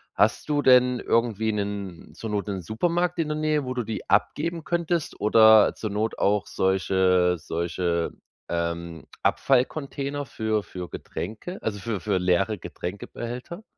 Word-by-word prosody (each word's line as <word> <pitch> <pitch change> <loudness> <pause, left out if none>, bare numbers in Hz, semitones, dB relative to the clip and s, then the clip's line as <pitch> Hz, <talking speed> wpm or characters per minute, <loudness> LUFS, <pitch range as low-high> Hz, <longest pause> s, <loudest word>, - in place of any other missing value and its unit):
hast - - +2
du 145 -1 +1
denn 125 -1 +5
irgendwie 110 -2 +1
'nen 100 -4 -5
zur 110 -2 -6
Not 105 0 -2
'nen 95 -2 -3
Supermarkt 175 - 0
in 165 - +1
der 150 0 -2
Nähe, 155 -1 +1
wo 130 0 -4
du 125 - -1
die 110 0 -6
abgeben 160 - +1
könntest? 170 -1 -1
Oder 110 0 +6
zur 110 -2 -4
Not 110 +2 -1
auch 100 0 +2
solche 95 -1 +2
solche, 85 +1 -2 0.4
ähm, 85 -2 -3 0.2
Abfallcontainer 140 +1 0
für 110 -3 -1
für 90 -3 -7
Getränke, 110 - -6
also, 105 -2 -3
für 105 -1 -3
für 100 -1 0
leere 90 +4 +1
Getränkebehälter? 120 - -7
110 Hz, 145 wpm, -25 LUFS, 95-135 Hz, 0.4 s, Oder